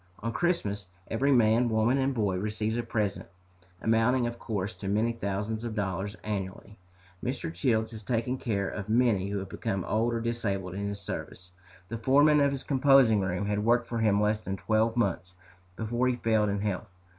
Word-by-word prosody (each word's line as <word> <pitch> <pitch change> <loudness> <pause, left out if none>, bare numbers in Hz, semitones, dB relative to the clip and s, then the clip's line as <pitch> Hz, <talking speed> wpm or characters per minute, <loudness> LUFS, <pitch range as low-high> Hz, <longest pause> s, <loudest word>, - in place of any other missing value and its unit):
On 115 0 -2
Christmas 105 - -1 0.2
every 135 +5 +2
man, 120 -1 +4
woman, 110 +4 +2
and 135 +1 +1
boy 105 -7 0
receives 105 +2 -2
a 120 - 0
present, 110 -4 -2 0.6
amounting, 115 +3 +3
of 120 0 -4
course, 105 -1 -3
to 100 - -8
many 110 +4 +2
thousands 105 +1 -3
of 115 -2 -4
dollars 100 0 -2
annually. 100 0 -5 0.4
Mr. 125 -10 -3
Childs 110 +4 +1
has 110 -2 -8
taken 120 +4 -1
care 100 -5 -1
of 100 0 -5
many 110 -5 +2
who 100 - -2
have 95 -1 -5
become 95 -4 -3
old 115 +2 +1
or - - 0
disabled 100 -6 -2
in 100 +1 -3
his 100 0 -5
service. 90 -1 -7 0.4
The 115 0 -4
foreman 145 +5 +5
of 140 -1 +3
his 135 -1 -4
composing 135 -5 +5
room 95 +1 -1
had 105 0 -1
worked 120 +2 +3
for 115 0 -3
him 105 -2 +3
less 105 +1 +1
than 95 0 -3
twelve 110 +3 +1
months 95 -4 -1 0.4
before 120 +4 0
he 125 - +2
failed 110 -3 +1
in 100 0 -1
health. 105 0 -2
110 Hz, 190 wpm, -28 LUFS, 100-120 Hz, 0.6 s, foreman